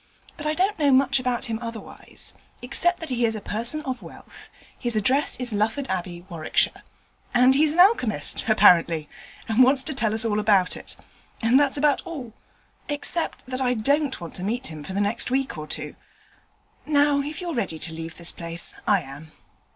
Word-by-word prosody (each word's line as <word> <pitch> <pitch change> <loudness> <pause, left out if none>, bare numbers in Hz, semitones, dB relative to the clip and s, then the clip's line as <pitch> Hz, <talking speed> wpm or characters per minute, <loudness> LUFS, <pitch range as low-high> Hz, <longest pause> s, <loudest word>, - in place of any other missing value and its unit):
But 300 -1 -5
I 305 - 0
don't 390 +3 0
know 290 -2 +3
much 270 +1 +4
about 250 -1 -1
him 225 -2 -3
otherwise, 230 -2 -5 0.3
except 345 +8 +1
that 325 - -6
he 245 -2 -1
is 225 -1 +1
a - - -4
person 230 +9 +1
of 255 -2 -4
wealth, - - -13 0.3
his 240 -2 -1
address 260 +7 +2
is 245 -3 +1
Lufford 220 +6 -1
Abbey, 175 -1 -4
Warwickshire, 165 -4 0 0.5
and 250 +2 +6
he's 295 +2 +3
an 345 - -2
alchemist, 250 - +3
apparently, 170 -7 +4 0.4
and 225 +3 +4
wants 265 +1 +3
to 305 - -2
tell 225 -5 0
us 225 +1 +4
all 210 -2 0
about 200 -3 +2
it; - - -7 0.4
and 235 +4 +4
that's 285 -1 +2
about 290 -1 +2
all 265 -9 -8 0.6
except 295 +3 -2
that 255 +1 -5
I 250 -1 +1
don't 280 +5 0
want 170 -2 -8
to 180 - -6
meet 235 +2 -2
him 155 -1 -8
for 190 - -7
the 200 - 0
next 205 +4 +1
week 265 -3 -1
or 155 -1 -7
two. - - -4 0.9
Now, 290 -1 +3
if 295 +2 -6
you're 350 -2 -4
ready 195 - -2
to 160 +1 -4
leave 165 0 -8
this 170 -1 +2
place, 170 0 -4
I 200 -3 +4
am.' 145 +3 -11
240 Hz, 190 wpm, -24 LUFS, 195-280 Hz, 0.9 s, and